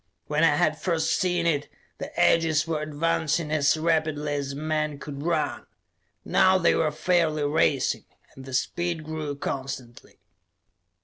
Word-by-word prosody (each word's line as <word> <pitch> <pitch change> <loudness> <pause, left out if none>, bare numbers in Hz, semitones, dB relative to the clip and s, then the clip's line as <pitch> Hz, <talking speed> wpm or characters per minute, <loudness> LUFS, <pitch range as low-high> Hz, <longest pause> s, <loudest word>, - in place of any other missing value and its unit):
When 150 +2 0
I 150 -3 +5
had 155 +1 +1
first 165 -2 0
seen 175 -2 0
it, 150 -3 0 0.3
the - - -6
edges 160 -2 +3
were 160 -2 -2
advancing 160 +1 -1
as 155 0 +3
rapidly 155 -2 0
as 140 -1 -3
a - - -7
man 155 0 -2
could 140 -1 -8
run; 170 +3 -1 0.6
now 190 0 +4
they 170 -2 +3
were 160 - +2
fairly 155 -1 +1
racing, 145 -2 +1 0.3
and 130 - -12
the 130 - -9
speed 170 +4 -1
grew 155 -2 -4
constantly. 130 -3 -6
155 Hz, 145 wpm, -26 LUFS, 145-165 Hz, 0.6 s, I